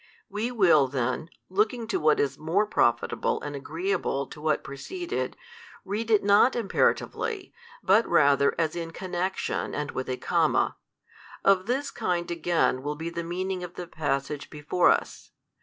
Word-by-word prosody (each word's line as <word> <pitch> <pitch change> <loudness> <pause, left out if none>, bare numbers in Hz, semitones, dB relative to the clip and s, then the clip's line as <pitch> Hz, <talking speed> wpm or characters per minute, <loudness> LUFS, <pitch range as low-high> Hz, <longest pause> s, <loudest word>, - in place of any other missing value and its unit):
We 220 +4 -2
will 175 - +5
then, 130 +4 -2 0.2
looking 215 +5 0
to 190 -4 0
what 155 -1 +3
is 140 - +1
more 170 +7 +1
profitable 120 - +1
and 145 -1 -5
agreeable 235 - -2
to 150 - -12
what 155 0 +1
preceded, 350 - -4 0.5
read 215 +4 -3
it 215 -2 +4
not 205 +5 +5
imperatively, 380 - 0 0.3
but 210 +4 +4
rather 140 0 +4
as 160 -1 0
in 165 -1 -4
connection 185 +1 -3
and 150 -1 -3
with 130 - -4
a 130 - -2
comma. - - +1 0.7
Of 195 0 +4
this 275 +4 -1
kind 175 -1 -2
again 170 -6 +1
will 145 +2 -3
be 165 +2 -5
the 170 0 -4
meaning 185 +2 -3
of 175 0 -8
the 180 - -5
passage 145 -3 -3
before 150 +4 +2
us. - - 0
175 Hz, 155 wpm, -27 LUFS, 150-205 Hz, 0.7 s, will